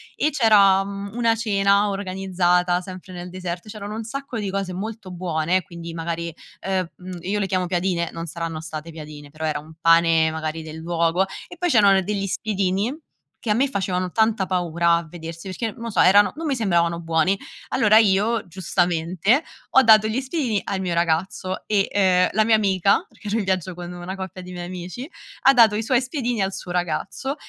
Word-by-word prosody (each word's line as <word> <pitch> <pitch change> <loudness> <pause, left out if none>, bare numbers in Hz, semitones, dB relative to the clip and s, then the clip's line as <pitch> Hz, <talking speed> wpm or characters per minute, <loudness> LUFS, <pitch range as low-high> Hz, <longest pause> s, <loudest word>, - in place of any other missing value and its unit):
e 305 - +1
c'era, 200 -7 +5
mhmm, 200 0 -6
una 230 -1 +2
cena 200 -2 +2
organizzata 185 -2 +1
sempre 185 0 -10
nel 180 0 -7
deserto. 180 +2 -6
C'erano 210 0 -7
un 225 +1 -4
sacco 260 0 -5
di 200 -2 -3
cose 195 -1 -3
molto 210 0 -6
buone, 175 0 0
quindi 170 -2 -9
magari 170 0 -4 0.3
ehm, 190 -2 -1 0.3
io 195 +5 -2
le 200 - 0
chiamo 185 -2 -1
piadine, 175 -1 0
non 165 0 -6
saranno 165 -1 -5
state 160 0 -7
piadine, 150 -2 -10
però 155 +2 -6
era 155 - -1
un 155 +2 -13
pane 165 -1 +4
magari 160 0 -4
del 160 0 -8
luogo 170 +3 0 0.2
e 355 - -12
poi 355 -1 +1
c'erano 200 -6 +5
degli 195 +1 -2
spiedini, 200 +2 -1 0.5
che 225 - -3
a 210 - +3
me 270 +4 +3
facevano 185 -5 -2
tanta 220 -3 +2
paura 170 -2 +1
a 170 -1 -2
vedersi 165 +2 -8
perché 220 +4 -3
non - - -14
lo 230 - -3
so, 215 - -2
erano 200 +3 +6
non 325 - -4
mi 275 - +1
sembravano 170 -6 +1
buoni. 165 +4 +1 0.3
Allora 215 0 +5
io 215 +1 +3
giustamente, 180 - +1 0.3
ho 265 - +7
dato 215 -1 +6
gli 235 +5 -1
spiedini 260 - -1
al 195 - -3
mio 180 -2 -2
ragazzo, 170 +3 -1
e, 200 -2 +1
ehm, 185 -2 +3
la 215 +1 +2
mia 225 -1 +5
amica, 195 -2 +2
perché 210 - -14
ero 215 +3 0
in 210 - -1
viaggio 185 -1 -1
con 175 0 -8
una 180 +2 -6
coppia 190 -1 -7
di 180 0 -9
miei 175 -1 -6
amici, 185 +8 -7 0.4
ha 270 - +6
dato 225 -4 +6
i 220 - -1
suoi 255 +3 +2
spiedini 245 -5 -2
al 195 0 -1
suo 180 - -7
ragazzo 180 - -2
190 Hz, 195 wpm, -23 LUFS, 170-210 Hz, 0.5 s, ho